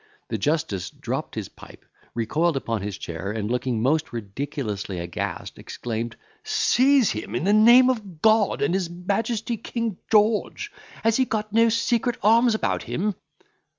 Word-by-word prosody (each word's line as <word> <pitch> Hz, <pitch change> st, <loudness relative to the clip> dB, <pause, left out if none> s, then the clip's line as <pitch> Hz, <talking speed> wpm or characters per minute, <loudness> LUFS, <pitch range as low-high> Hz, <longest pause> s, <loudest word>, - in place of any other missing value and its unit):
The 110 Hz, -, -1 dB
justice 145 Hz, -, -1 dB
dropped -, -, -5 dB
his -, -, -4 dB
pipe, -, -, -15 dB, 0.3 s
recoiled 150 Hz, +8 st, +1 dB
upon 115 Hz, -5 st, -2 dB
his 100 Hz, -1 st, -4 dB
chair, 85 Hz, +4 st, -5 dB
and, 105 Hz, 0 st, -3 dB
looking 125 Hz, -2 st, -1 dB
most 155 Hz, +4 st, +1 dB
ridiculously 110 Hz, -3 st, -4 dB
aghast, 85 Hz, -1 st, -5 dB
exclaimed, 115 Hz, -1 st, -5 dB, 0.3 s
"Seize 265 Hz, -1 st, +3 dB
him, 110 Hz, 0 st, -5 dB
in 120 Hz, -, -1 dB
the 200 Hz, +3 st, +3 dB
name 240 Hz, +4 st, +7 dB
of 210 Hz, -10 st, -2 dB
God 220 Hz, +1 st, +3 dB
and -, -, +1 dB
his 185 Hz, -3 st, 0 dB
Majesty 210 Hz, +6 st, -2 dB
King 230 Hz, -2 st, -4 dB
George! 215 Hz, 0 st, +2 dB, 0.3 s
Has 225 Hz, 0 st, +3 dB
he 260 Hz, -, +3 dB
got 215 Hz, -3 st, -3 dB
no 230 Hz, +1 st, +5 dB
secret 230 Hz, +1 st, +1 dB
arms 230 Hz, +2 st, +5 dB
about -, -, -1 dB
him!" 205 Hz, +3 st, -2 dB
180 Hz, 150 wpm, -24 LUFS, -, 0.3 s, name